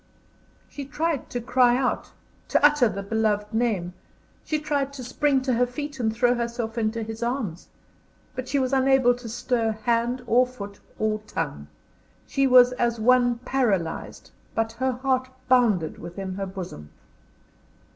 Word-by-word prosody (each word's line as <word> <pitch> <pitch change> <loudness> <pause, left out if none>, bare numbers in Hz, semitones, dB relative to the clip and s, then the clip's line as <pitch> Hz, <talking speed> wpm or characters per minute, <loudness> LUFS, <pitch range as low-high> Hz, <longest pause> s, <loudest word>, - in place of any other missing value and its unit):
She 280 - -7
tried 310 +1 -2
to 245 - -3
cry 245 0 +3
out; 255 -1 -1 0.4
to - - +3
utter 295 -5 +5
the 200 -1 -5
beloved 210 0 0
name; 215 -7 0 0.5
she 310 - -1
tried 285 -2 -1
to 265 -2 -7
spring 265 +2 +1
to 260 -1 +1
her 245 +1 +2
feet 285 +2 -6
and 220 -2 +1
throw 240 +2 +2
herself 235 -1 -3
into 225 0 -1
his 225 +1 -7
arms! 235 -8 -3 0.7
But 255 0 -5
she 285 - 0
was 260 -1 0
unable 265 -2 +4
to 245 -1 -8
stir 230 -1 0
hand, 240 +2 +1
or 250 +2 +4
foot, 205 -5 -9 0.2
or 215 0 0
tongue. 75 - -4 0.6
She 275 0 +1
was 250 -1 +7
as 240 -2 0
one 245 +1 +4
paralysed, 205 -11 -1 0.2
but 225 0 0
her 260 +1 -1
heart 255 0 0 0.2
bounded 225 -11 +3
within 190 +2 -6
her 195 +1 -4
bosom. 180 - -8
245 Hz, 155 wpm, -25 LUFS, 220-260 Hz, 0.7 s, was